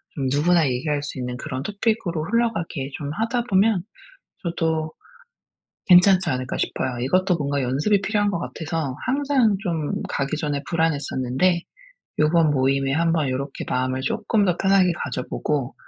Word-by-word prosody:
좀 140 - -2
누구나 160 +2 +3
얘기할 145 +3 -1
수 145 -2 -5
있는 125 0 -4
그런 130 -2 -5
토픽으로 200 -4 -1
흘러가게 200 - -1
좀 145 -1 -5
하다 235 +5 -1
보면 195 -1 +3 0.6
저도 160 -2 -1 1.0
괜찮지 185 +1 +6
않을까 130 -1 -2
싶어요. 125 -2 -2
이것도 180 +7 +2
뭔가 140 -2 -1
연습이 150 +11 +1
필요한 205 0 +1
것 175 - -2
같아서 160 -5 -4
항상 265 -6 +2
좀 165 -7 -2
가기 140 +2 -2
전에 145 -2 -2
불안했었는데 160 +1 +1 0.6
요번 155 +1 +4
모임에 135 0 +1
한번 165 -1 +1
요렇게 135 +2 -4
마음을 130 +1 -1
쪼끔 205 - 0
더 180 -2 +1
편하게 190 -2 +4
가져 125 -2 -4
보고 140 -4 -2
160 Hz, 330 characters per minute, -23 LUFS, 140-190 Hz, 1.0 s, 괜찮지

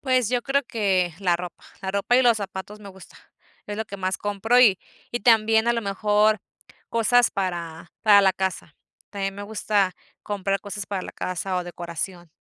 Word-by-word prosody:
Pues 255 -4 +1
yo 245 -1 0
creo 280 +1 +1
que 190 -7 0
la 175 -3 +2
ropa, 175 0 -9 0.2
la 190 -1 -3
ropa 200 +5 +2
y 260 - +5
los 235 -2 +5
zapatos 200 +1 -7
me 200 - -10
gusta. 190 -1 -14 0.5
Es 205 0 -5
lo 220 - -2
que 200 - -8
más 185 0 -2
compro, 205 +4 +1
y 205 -7 +6 0.3
y 240 - -2
también 225 0 +4
a - - +4
lo 230 - -1
mejor 210 +2 +2 0.5
cosas 240 +1 +3
para 170 -4 -4
para 205 -2 +7
la 190 -1 +4
casa. 185 -5 -4 0.4
También 195 -1 -3
me 205 - -7
gusta 205 -2 0 0.3
comprar 195 -1 -2
cosas 205 0 -6
para 195 -2 -3
la - - -8
casa 185 +1 -3
o 180 - -2
decoración. 175 0 -6
200 Hz, 190 wpm, -24 LUFS, 185-220 Hz, 0.5 s, para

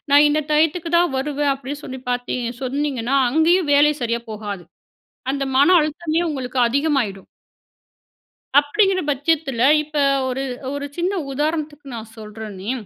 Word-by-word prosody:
நான் 290 +1 +7
இந்த 295 - +1
டயத்துக்கு 320 +3 +2
தான் 345 -5 +2
வருவேன் 285 +1 0
அப்படீன்னு 280 +2 -7
சொல்லி 260 0 -6
பார்த்தீ 245 0 -2 0.3
சொன்னீங்கன்னா, 270 -1 -1
அங்கயும் 320 +2 +3
வேல 290 +1 +5
சரியா 235 0 -1
போகாது. 205 -4 -6 0.7
அந்த 275 0 -2
மன 280 +5 +5
அழுத்தமே, 310 +1 -1
உங்களுக்கு 260 -3 -3
அதிகமாயிடும். 265 -8 -1 1.3
அப்படீங்கிற 380 +6 +1
பட்சத்துல, 285 -3 0 0.2
இப்ப 305 0 -10 0.3
ஒரு 260 +1 -2 0.3
ஒரு 285 0 -4
சின்ன 355 +3 0 0.2
உதாரணத்துக்கு, 300 0 -2
நான் 220 -1 -9
சொல்றனே. 210 -1 -7
285 Hz, 125 wpm, -21 LUFS, 245-305 Hz, 1.3 s, நான்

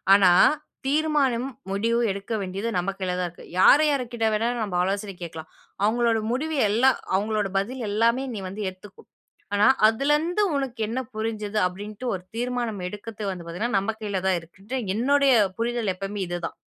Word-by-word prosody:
ஆனா 190 -3 +6 0.5
தீர்மானம், 275 -4 +1 0.2
முடிவு 225 +4 +1
எடுக்க 200 +3 -5
வேண்டியது 195 +4 -3
நம்ம 180 +2 0
கையில 185 -1 -1
தான் 180 -1 -1
இருக்கு. 170 - -15 0.2
யாரு 290 +10 +7
யார்க்கிட்ட 245 -5 0
வேணா 220 +2 +1 0.2
நம்ம 200 -4 -4
ஆலோசனை 195 +2 -2
கேட்கலாம். 160 -1 -8 0.3
அவுங்களோட 230 +1 +2
முடிவு 310 +6 -1
எல்லாம் 240 +5 +4 0.2
அவுங்களோட 210 +1 0
பதில் 245 +7 -2
எல்லாமே 230 +5 +2
நீ - - -4
வந்து 200 +3 -6
ஏத்துக்கோ! 185 +2 -14 0.5
ஆனா, 205 +1 +4 0.2
அதுல 275 +7 +2
இருந்து 350 +7 0
உனக்கு 265 -4 -3
என்ன 235 +4 -2 0.2
புரிஞ்சது 215 -1 -3
அப்பிடின்டு 205 +6 -5
ஒரு 185 -2 -5
தீர்மானம் 240 -3 -2
எடுக்கிறது 210 +3 -7
வந்து 180 -3 -5
பார்த்தீங்கன்னா, 200 +7 -2
நம்ம 200 +3 0
கையில 205 -3 -2
தான் 185 -2 +3
இருக்கு. 170 +4 -18 0.3
என்னுடைய 275 +3 +4 0.2
புரிதல் 230 -3 0
எப்பமே 195 +2 -5
இதுதான். 175 -1 -4
215 Hz, 160 wpm, -25 LUFS, 195-245 Hz, 0.5 s, யாரு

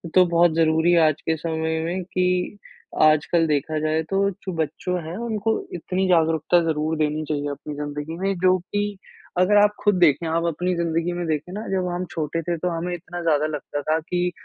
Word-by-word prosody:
तो 185 -1 +7
बहुत 170 -1 +3
ज़रूरी 160 +1 +3
है 170 -1 +5
आज 155 -1 -1
के 160 - 0
समय 160 0 -2
में 180 +3 -2
कि 180 +2 -1 0.4
आजकल 155 +2 +4
देखा 150 +1 0
जाए 155 +1 0
तो 195 0 +2
चू 190 - -4
बच्चों 160 +4 -2
है 160 +2 -6
उनको 225 -1 -1
इतनी 185 +2 -1
जागरूकता 165 0 +3
ज़रूर 155 0 -1
देनी 155 0 0
चाहिए 145 -1 -1
अपनी 150 +1 -7
ज़िंदगी 150 +2 -5
में, 195 +2 0
जो 185 +1 +4
कि 205 +2 -3 0.4
अगर 185 +3 +4
आप 210 - +4
खुद 205 -1 +4
देखें, 165 -1 +4
आप 165 +1 0
अपनी 180 +3 -1
ज़िंदगी 170 0 -1
में 175 0 -3
देखें 155 +2 -2
ना 210 +3 -5
जब 185 -1 0
हम 180 +1 -2
छोटे 160 0 -2
थे, 170 +1 -2
तो 180 +3 -1
हमें 170 +1 -3
इतना 175 0 -6
ज़्यादा 155 -3 +2
लगता 145 -1 -4
था 155 +2 +1
कि 180 +2 -1
165 Hz, 200 wpm, -23 LUFS, 155-180 Hz, 0.4 s, तो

